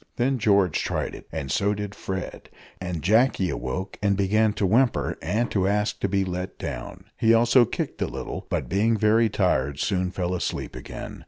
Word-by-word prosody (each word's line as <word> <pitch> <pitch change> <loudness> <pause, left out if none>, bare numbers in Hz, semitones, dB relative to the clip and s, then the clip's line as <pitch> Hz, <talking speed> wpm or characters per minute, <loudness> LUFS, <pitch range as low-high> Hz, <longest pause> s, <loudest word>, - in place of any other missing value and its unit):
Then 130 +2 +1
George 100 -6 +3
tried - - -2
it, - - -11
and 65 -1 -4
so 105 +1 +1
did 105 0 -5
Fred, 95 -2 -6 0.3
and 90 -4 -4
Jacky 110 -1 +3
awoke 90 +10 -4
and 100 -1 +2
began 105 +2 +3
to 105 - 0
whimper 95 - +2
and 115 +2 -1
to 95 -2 +1
ask 105 +1 0
to 100 - -1
be 95 0 +1
let 90 0 -4
down. - - -6 0.2
He 115 0 +5
also 120 +2 +5
kicked - - -4
a - - +1
little, - - -6
but, - - -1
being 110 +5 +2
very 110 +2 +3
tired, 70 -9 0
soon 90 +2 0
fell 90 0 -2
asleep 90 - -3
again. - - -8
100 Hz, 185 wpm, -25 LUFS, 90-110 Hz, 0.3 s, He